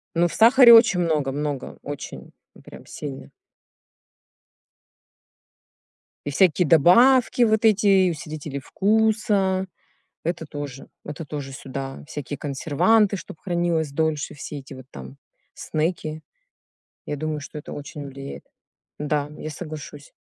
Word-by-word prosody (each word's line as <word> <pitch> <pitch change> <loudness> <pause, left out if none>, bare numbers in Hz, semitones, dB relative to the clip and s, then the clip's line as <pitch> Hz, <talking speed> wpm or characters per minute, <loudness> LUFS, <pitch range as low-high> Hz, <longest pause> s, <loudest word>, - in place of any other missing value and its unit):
Ну, 170 +1 +3
в 175 - -5
сахаре 240 +2 +8
очень 225 -5 +6
много 155 -5 0
много, 145 -1 -4
очень 145 -1 -8 0.2
и - - -15
прям - - -13
сильно. 140 -3 -8 3.0
И - - -1
всякие 170 +2 +3
добавки 240 - +5
вот 220 -1 +3
эти 215 -1 +4
и 190 -2 +5
усилители 155 -2 -6
вкуса- 200 - +1 0.6
это 170 0 -3
тоже, 145 -3 -7 0.2
это 150 +3 -6
тоже 140 -2 -6
сюда, 135 +1 -7
всякие 145 -1 -6
консерванты, 170 +10 +2
чтоб 185 - -9
хранилось 170 -4 -1
дольше, 155 0 -1
все 145 0 -7
эти 135 +1 -12
вот 130 -1 -11
там 65 0 -10 0.4
снеки. 155 -1 -3 0.8
Я 145 - -4
думаю, 155 +1 -3
что 150 - -9
это 150 - -8
очень 145 0 -8
влияет. 135 0 -9 0.6
Да, 150 -1 -1
я 155 - -6
соглашусь. 150 -2 -9
155 Hz, 125 wpm, -23 LUFS, 145-190 Hz, 3.0 s, сахаре